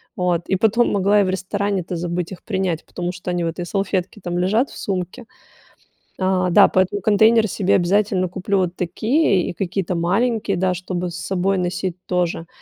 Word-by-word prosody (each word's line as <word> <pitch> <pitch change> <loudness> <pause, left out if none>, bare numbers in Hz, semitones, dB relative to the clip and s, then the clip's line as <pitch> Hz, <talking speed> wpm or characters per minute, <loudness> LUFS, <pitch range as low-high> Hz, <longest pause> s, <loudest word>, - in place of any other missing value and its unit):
вот. 180 -2 0
И 190 - +1
потом 220 +5 +2
могла 200 +1 +3
и - - +3
в 185 - -1
ресторане-то 190 -1 -2
забыть 175 +1 -3
их 190 - -9
принять, 190 -5 -2
потому 175 0 -4
что 180 0 -6
они 175 -1 -1
в - - 0
этой 170 +2 -4
салфетке 195 +1 -2
там 175 0 -3
лежат 215 +9 +1
в - - -12
сумке. 190 +5 -4 0.9
А, 185 -1 +1
да, 200 +3 +7
поэтому 190 +2 +1
контейнеры 220 +2 +4
себе 195 0 +1
обязательно 190 +1 +2
куплю 190 +3 -2
вот 180 -2 0
такие, 195 - +1
и - - -4
какие-то 185 0 -2
маленькие, 200 +4 0
да, 185 0 +1
чтобы 180 0 -4
с - - -8
собой 190 +1 -1
носить, 180 0 -2
тоже. 175 -2 -1
185 Hz, 180 wpm, -21 LUFS, 180-200 Hz, 0.9 s, да